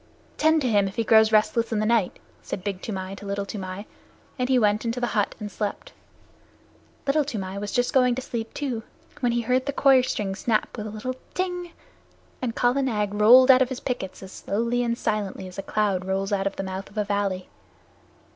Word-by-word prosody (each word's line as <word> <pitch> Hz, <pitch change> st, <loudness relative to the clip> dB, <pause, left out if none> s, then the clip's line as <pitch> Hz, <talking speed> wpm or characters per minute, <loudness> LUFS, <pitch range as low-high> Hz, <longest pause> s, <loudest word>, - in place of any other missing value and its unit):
"Tend 315 Hz, +1 st, +3 dB
to -, -, +1 dB
him 205 Hz, -4 st, +3 dB
if 195 Hz, -, -7 dB
he 230 Hz, -, 0 dB
grows 220 Hz, 0 st, +5 dB
restless 225 Hz, +2 st, +2 dB
in 220 Hz, -, 0 dB
the 215 Hz, -, +1 dB
night," 225 Hz, -4 st, +1 dB, 0.2 s
said 185 Hz, -, -6 dB
Big 195 Hz, -2 st, -3 dB
Toomai 190 Hz, -3 st, -5 dB
to 205 Hz, -, -10 dB
Little 200 Hz, 0 st, -2 dB
Toomai, 195 Hz, 0 st, -6 dB, 0.5 s
and 250 Hz, 0 st, 0 dB
he 260 Hz, -, +4 dB
went 210 Hz, -2 st, +2 dB
into 230 Hz, +1 st, -2 dB
the 245 Hz, -, +1 dB
hut 205 Hz, -2 st, 0 dB
and 210 Hz, -1 st, -6 dB
slept. 205 Hz, +1 st, -4 dB, 1.1 s
Little 290 Hz, +2 st, +3 dB
Toomai 200 Hz, -8 st, -4 dB
was 205 Hz, 0 st, -4 dB
just 245 Hz, -1 st, 0 dB
going 250 Hz, -2 st, +4 dB
to 260 Hz, -, -3 dB
sleep, 225 Hz, -2 st, -4 dB
too, 260 Hz, -6 st, -2 dB, 0.4 s
when 245 Hz, -2 st, +1 dB
he 240 Hz, 0 st, +1 dB
heard 255 Hz, +3 st, 0 dB
the -, -, +1 dB
coir 270 Hz, -2 st, +5 dB
string 205 Hz, -5 st, -2 dB
snap 215 Hz, +2 st, -1 dB
with 215 Hz, -2 st, -5 dB
a -, -, -5 dB
little 220 Hz, +5 st, -4 dB, 0.2 s
"tang," 360 Hz, -2 st, -3 dB, 0.7 s
and 240 Hz, -3 st, -2 dB
Kala 250 Hz, +3 st, +2 dB
Nag 210 Hz, -6 st, -1 dB
rolled 245 Hz, +6 st, +8 dB
out 255 Hz, 0 st, +6 dB
of 255 Hz, -, +3 dB
his 260 Hz, -1 st, -4 dB
pickets 195 Hz, -8 st, -4 dB
as 190 Hz, -, -10 dB
slowly 235 Hz, +6 st, -1 dB
and 235 Hz, -1 st, 0 dB
as 235 Hz, -, -7 dB
silently 205 Hz, -3 st, -2 dB
as 185 Hz, +1 st, -9 dB
a -, -, -1 dB
cloud 200 Hz, -2 st, 0 dB
rolls 195 Hz, +2 st, -1 dB
out 195 Hz, 0 st, +1 dB
of 195 Hz, -, -4 dB
the -, -, -4 dB
mouth 190 Hz, 0 st, -5 dB
of 210 Hz, -, -16 dB
a 210 Hz, -, +2 dB
valley. 200 Hz, -2 st, -1 dB
215 Hz, 220 wpm, -25 LUFS, 200-250 Hz, 1.1 s, rolled